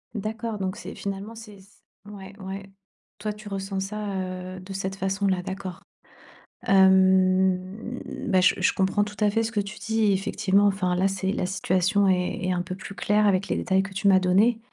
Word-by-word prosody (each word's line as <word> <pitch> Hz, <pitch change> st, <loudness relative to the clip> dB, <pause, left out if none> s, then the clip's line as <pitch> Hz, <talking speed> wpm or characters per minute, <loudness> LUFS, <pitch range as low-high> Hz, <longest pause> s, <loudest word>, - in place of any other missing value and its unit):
D'accord 220 Hz, +1 st, -4 dB
donc 190 Hz, -1 st, -3 dB
c'est -, -, -8 dB
finalement 200 Hz, +3 st, -5 dB
c'est 215 Hz, -3 st, -11 dB
c 190 Hz, -, -18 dB, 0.4 s
ouais, 195 Hz, -1 st, -10 dB
ouais. 195 Hz, +1 st, -7 dB, 0.5 s
Toi 210 Hz, 0 st, -3 dB
tu 210 Hz, 0 st, -12 dB
ressens 195 Hz, 0 st, -3 dB
ça, 205 Hz, 0 st, -4 dB, 0.4 s
heu, -, -, -8 dB
de 190 Hz, +1 st, -9 dB
cette 190 Hz, 0 st, -3 dB
façon-là, 190 Hz, -1 st, 0 dB
d'accord. 190 Hz, -1 st, -6 dB, 0.9 s
Hem, 190 Hz, +3 st, +3 dB, 0.3 s
bah, 190 Hz, -4 st, +3 dB
je 180 Hz, -, +4 dB
je -, -, +3 dB
comprends 195 Hz, +2 st, +1 dB
tout 210 Hz, 0 st, -8 dB
à 210 Hz, -1 st, +3 dB
fait 225 Hz, +2 st, +1 dB
ce 225 Hz, -, -3 dB
que 210 Hz, -, -1 dB
tu 200 Hz, +1 st, -5 dB
dis, 220 Hz, 0 st, -1 dB
et 205 Hz, -, +4 dB
effectivement 195 Hz, +1 st, +2 dB
enfin 185 Hz, -2 st, 0 dB
là 185 Hz, +2 st, +2 dB
c'est 190 Hz, 0 st, -1 dB
la 180 Hz, -, -1 dB
situation 190 Hz, +2 st, +1 dB
est 180 Hz, -1 st, +1 dB
est 185 Hz, -, +1 dB
un 175 Hz, -1 st, 0 dB
peu 185 Hz, -, -5 dB
plus 195 Hz, +1 st, -9 dB
claire 210 Hz, +4 st, +2 dB
avec 195 Hz, 0 st, +2 dB
les -, -, -1 dB
détails 190 Hz, 0 st, +1 dB
que 195 Hz, 0 st, -8 dB
tu 200 Hz, +1 st, 0 dB
m'as 190 Hz, -1 st, +6 dB
donnés. 200 Hz, +6 st, +3 dB
195 Hz, 200 wpm, -25 LUFS, 190-205 Hz, 0.9 s, m'as